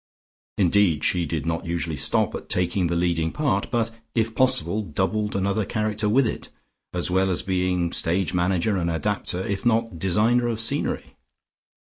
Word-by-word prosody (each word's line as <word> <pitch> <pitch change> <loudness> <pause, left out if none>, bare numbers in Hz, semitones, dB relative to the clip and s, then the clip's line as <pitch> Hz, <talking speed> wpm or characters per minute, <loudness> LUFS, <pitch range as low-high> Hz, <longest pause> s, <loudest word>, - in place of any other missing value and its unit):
Indeed 90 -5 +3
she 85 -2 +1
did 80 -2 -3
not 85 0 -2
usually 85 -2 -2
stop 70 - +1
at - - -7
taking 90 0 +1
the 85 - -1
leading 85 -2 0
part, 135 -10 0
but, 115 -2 0 0.2
if 115 -1 +1
possible, 130 -4 +2
doubled 105 +4 -1
another 100 +2 0
character 105 0 -1
with 130 +5 +4
it, 110 - -4 0.4
as 90 0 0
well 95 +1 +2
as 90 - 0
being 90 -2 0
stage 85 0 +1
manager 90 +3 +1
and 85 -2 -1
adapter, 95 +1 -2
if 100 -1 -3
not 115 -6 +1
designer 110 +7 +2
of 115 -2 -2
scenery. 115 - -2
95 Hz, 160 wpm, -24 LUFS, 85-110 Hz, 0.4 s, with